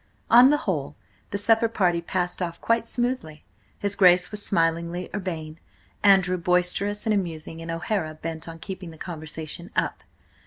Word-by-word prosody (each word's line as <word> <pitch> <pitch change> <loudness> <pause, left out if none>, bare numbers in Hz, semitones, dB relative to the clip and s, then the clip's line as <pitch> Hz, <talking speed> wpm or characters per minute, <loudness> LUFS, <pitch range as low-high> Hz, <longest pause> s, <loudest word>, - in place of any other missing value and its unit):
On 245 +3 +9
the 295 - +4
whole, 150 - -3 0.3
the 200 - -2
supper 225 +2 +4
party 180 -6 +1
passed 180 +1 -2
off 170 -2 -3
quite 230 0 +1
smoothly. 240 - -3 0.3
His 200 -1 -1
Grace 180 0 +5
was 210 -1 -4
smilingly 170 0 0
urbane, 165 -5 -5 0.4
Andrew 190 -2 +5
boisterous 180 +4 0
and 220 - +2
amusing, 165 -4 -3
and 165 - -7
O'Hara 165 -1 -2
bent 160 +1 -6
on 165 0 -8
keeping 185 0 -7
the 160 - -12
conversation 160 0 -6
up. - - 0
180 Hz, 155 wpm, -25 LUFS, 165-205 Hz, 0.4 s, On